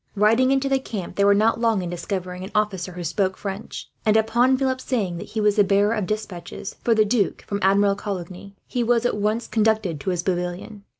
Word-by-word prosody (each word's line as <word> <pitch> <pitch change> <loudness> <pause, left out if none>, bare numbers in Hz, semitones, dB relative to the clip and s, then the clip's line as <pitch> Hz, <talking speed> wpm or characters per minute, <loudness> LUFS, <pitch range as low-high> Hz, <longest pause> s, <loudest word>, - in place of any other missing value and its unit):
Riding 225 +5 +4
into 270 0 +2
the 270 0 +2
camp, 200 -9 -6
they 200 - +2
were 200 0 +5
not 220 +2 +2
long 225 -5 +2
in 175 - -4
discovering 180 0 -4
an 190 - -6
officer 195 -4 -1
who 175 0 -6
spoke 190 +3 -1
French 200 +1 -6
and, 215 0 +4
upon 235 +4 +3
Philip 260 -1 -1
saying 200 -11 -2
that - - -7
he 220 - -3
was 210 0 +2
the 205 - +6
bearer 200 +2 +2
of 210 -5 -2
despatches 200 -4 -5
for 230 - +3
the 215 -1 +4
Duc 210 -2 0
from 200 - -3
Admiral 200 +1 +3
Coligny, 195 -1 -6
he 245 - -2
was 235 0 +2
at 245 - +1
once 215 +3 -1
conducted 215 -7 +1
to 140 - -3
his 175 -2 -1
pavilion. 180 +3 -3
205 Hz, 220 wpm, -23 LUFS, 190-225 Hz, -, the